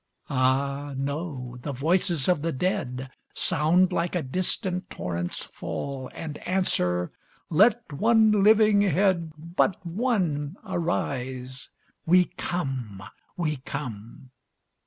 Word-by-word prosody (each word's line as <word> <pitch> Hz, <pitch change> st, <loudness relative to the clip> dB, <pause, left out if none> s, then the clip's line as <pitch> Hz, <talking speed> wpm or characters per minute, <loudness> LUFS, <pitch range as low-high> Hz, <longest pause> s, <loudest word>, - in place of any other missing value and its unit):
Ah, 140 Hz, +2 st, +1 dB
no; 135 Hz, -3 st, -4 dB
the 145 Hz, -, -4 dB
voices 160 Hz, +1 st, +1 dB
of 180 Hz, -5 st, +3 dB
the 165 Hz, +2 st, 0 dB
dead 130 Hz, -5 st, -2 dB, 0.2 s
Sound 175 Hz, +5 st, +2 dB
like 170 Hz, +2 st, 0 dB
a 175 Hz, -, 0 dB
distant 180 Hz, -, -1 dB
torrent's 85 Hz, 0 st, -4 dB
fall, 135 Hz, -2 st, -5 dB
And 150 Hz, -2 st, -6 dB
answer, 90 Hz, -, 0 dB, 0.4 s
"Let 210 Hz, +1 st, +4 dB
one 220 Hz, +6 st, +4 dB
living 215 Hz, -1 st, +6 dB
head, 185 Hz, -3 st, +2 dB
But 170 Hz, +4 st, 0 dB
one, 175 Hz, -, 0 dB
arise 130 Hz, -8 st, -3 dB, 0.4 s
we 180 Hz, +2 st, +6 dB
come, 130 Hz, -, -3 dB, 0.3 s
we 155 Hz, -4 st, 0 dB
come!" 125 Hz, -2 st, -7 dB
155 Hz, 105 wpm, -26 LUFS, 130-180 Hz, 0.4 s, living